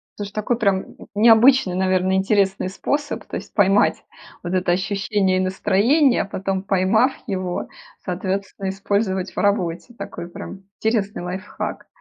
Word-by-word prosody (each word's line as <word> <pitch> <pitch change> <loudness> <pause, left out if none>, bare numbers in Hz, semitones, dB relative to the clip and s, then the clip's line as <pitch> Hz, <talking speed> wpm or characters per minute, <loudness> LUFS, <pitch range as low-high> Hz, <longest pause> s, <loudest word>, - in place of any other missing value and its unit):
Слушай, 205 -1 -6
такой 225 +3 -1
прям 200 -3 +3
н - - -15 0.2
необычный, 225 -1 +6
наверное, 185 0 +1
интересный 195 -1 +1
способ, 290 +8 -3
то - - -7
есть - - -7
поймать 200 -1 +3 0.4
вот 175 - -4
это 185 -1 +1
ощущение 195 0 0
и - - +1
настроение, 210 +9 +3
а - - -2
потом, 195 -1 -3
поймав 200 +6 +2
его, 185 -5 -3 0.4
соответственно, 190 +1 -3
использовать 195 -1 -1
в - - -24
работе. 200 +2 0
Такой 190 -3 -7
прям 190 +2 -9
интересный 210 -4 -1
лайфхак. 185 +3 -5
195 Hz, 140 wpm, -21 LUFS, 185-210 Hz, 0.4 s, необычный